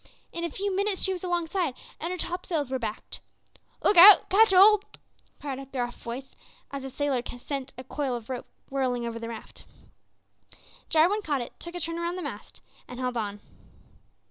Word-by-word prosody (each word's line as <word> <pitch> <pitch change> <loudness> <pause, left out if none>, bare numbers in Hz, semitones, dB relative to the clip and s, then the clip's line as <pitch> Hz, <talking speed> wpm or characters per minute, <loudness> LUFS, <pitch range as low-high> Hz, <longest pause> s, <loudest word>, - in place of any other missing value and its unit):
In 340 - -4
a 340 - -1
few 390 +4 -2
minutes 400 0 0
she 380 - +2
was 360 - -6
alongside, 345 -4 -1 0.2
and 335 - -3
her 365 - -3
topsails 340 -6 -2
were 260 - 0
backed. 220 -3 -5 0.6
"Look 405 - +4
out! 385 +3 +10
catch 440 +3 +6
hold!" 400 +2 +7 0.6
cried 275 -2 -4
a 275 - -8
gruff 245 -2 -4
voice, 250 +3 -7 0.4
as 275 -1 -5
a 270 - -5
sailor 275 -1 0 0.2
sent 275 +1 -5
a 255 - -7
coil 265 -1 -2
of 230 -2 -7
rope 255 -2 -5 0.2
whirling 255 -3 0
over 230 -1 -4
the 230 0 -5
raft. 230 - -10 1.2
Jarwin 350 +7 +4
caught 290 -8 -1
it, 240 - -7
took 345 +1 -8
a - - -3
turn 330 0 -2
round 340 +1 -2
the 365 - -4
mast, - - -8 0.3
and 250 - -8
held 250 -1 -2
on. 205 -3 -3
290 Hz, 185 wpm, -27 LUFS, 250-360 Hz, 1.2 s, out